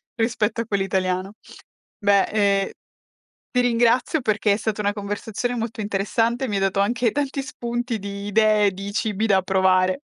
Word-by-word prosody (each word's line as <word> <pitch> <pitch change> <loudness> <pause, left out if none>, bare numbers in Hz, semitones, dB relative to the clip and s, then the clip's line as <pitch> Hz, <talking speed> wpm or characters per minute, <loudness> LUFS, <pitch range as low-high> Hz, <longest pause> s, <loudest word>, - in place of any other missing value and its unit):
Rispetto 230 0 0
a 230 - -4
quello 200 -3 0
italiano. 185 0 -1 0.6
Beh, 200 -2 +3
ehm, 200 -2 +1 0.8
ti 250 - +1
ringrazio 245 +5 +2
perché 215 -3 +1
è 200 - +2
stata 215 -1 -3
una 205 0 +1
conversazione 210 +4 -3
molto 225 0 -4
interessante, 225 +5 0
mi 205 - -1
hai - - 0
dato 195 0 +1
anche 230 +3 +1
tanti 280 +2 -2
spunti 240 -2 -4
di 200 0 -6
idee, 210 0 +3
di 195 +2 -6
cibi 215 0 -1
da 195 -3 +4
provare. 185 -1 +3
210 Hz, 160 wpm, -23 LUFS, 200-235 Hz, 0.8 s, da